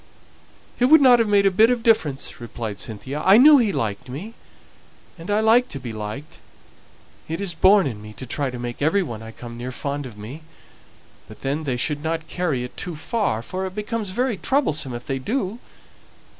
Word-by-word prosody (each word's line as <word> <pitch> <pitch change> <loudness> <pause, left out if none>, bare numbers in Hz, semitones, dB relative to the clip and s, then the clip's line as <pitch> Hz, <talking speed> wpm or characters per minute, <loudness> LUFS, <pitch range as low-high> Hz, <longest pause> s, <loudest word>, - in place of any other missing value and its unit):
"It 245 - +4
wouldn't 260 -4 +7
have 230 - +2
made 200 -1 +3
a 195 - +5
bit 220 +5 +5
of 245 -2 0
difference," 155 - +1
replied 115 -3 -6
Cynthia. 120 +7 -5
"I 195 +2 +7
knew 290 +3 +8
he 220 -4 +2
liked 110 - -3
me, 175 - -7 0.8
and 165 +1 -11
I 205 +1 +2
like 230 +3 +4
to 140 - -6
be 120 -3 -7
liked; 110 +7 -7 0.9
it's 170 +3 -2
born 190 +4 +5
in 115 -6 -4
me 105 0 -10
to 130 - -8
try 140 +2 -2
to 125 - -7
make 120 +1 -6
every 165 +7 +2
one 115 -9 -7
I 110 - -9
come 120 0 -10
near 125 +1 -5
fond 140 +1 -4
of 110 -4 -12
me; 120 +10 -9 0.9
but - - -14
then 145 +3 -2
they 130 -3 -1
shouldn't 160 +5 -2
carry 165 -10 -2
it 125 - -8
too 175 - -4
far, 155 - -2
for 190 +5 -4
it 185 - -10
becomes 210 0 -3
very 240 +2 -1
troublesome 155 - 0
if 120 - -8
they 135 -1 -2
do. 215 - -2
155 Hz, 195 wpm, -22 LUFS, 125-210 Hz, 0.9 s, knew